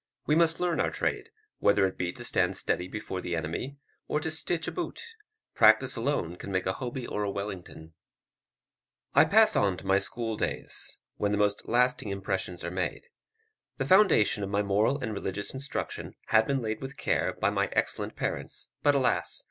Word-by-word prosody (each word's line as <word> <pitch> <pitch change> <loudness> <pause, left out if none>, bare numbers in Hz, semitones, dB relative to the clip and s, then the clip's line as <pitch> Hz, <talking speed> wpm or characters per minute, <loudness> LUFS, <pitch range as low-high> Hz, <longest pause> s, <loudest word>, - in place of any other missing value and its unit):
We 150 - +2
must 165 0 +4
learn 175 -2 0
our - - +2
trade, - - -2 0.3
whether 100 -1 +4
it 95 - -2
be 90 -1 -2
to 120 - -9
stand 95 -3 +2
steady 90 -1 0
before 95 -2 -5
the 85 -1 -2
enemy, 85 - -4 0.3
or 150 - 0
to 160 - -2
stitch 160 +1 -2
a - - -1
boot; 355 - -4 0.5
practice - - +5
alone 115 - -1
can 100 - -7
make 95 -1 0
a 95 - +1
Hoby 125 +1 -5
or 105 - -3
a 100 - -1
Wellington. 95 -5 -6 1.2
I - - +7
pass 215 +1 +5
on 100 -3 +2
to - - -11
my 95 +1 +4
school 115 0 -2
days, - - -2 0.2
when 100 -1 0
the 105 - +1
most 105 0 0
lasting 125 -2 +2
impressions 95 -2 -3
are 85 - -3
made. 95 - -3 0.7
The - - -1
foundation 185 - +4
of 100 - -3
my 100 +1 +1
moral 105 +7 +2
and 120 -6 -4
religious 100 0 -3
instruction 135 +2 -5
had 110 0 +4
been 135 -3 0
laid 110 0 -3
with 135 +1 -7
care - - 0
by - - 0
my - - 0
excellent - - -1
parents; - - -4
but, 145 -1 +4
alas! 130 -2 +1
105 Hz, 190 wpm, -28 LUFS, 95-140 Hz, 1.2 s, I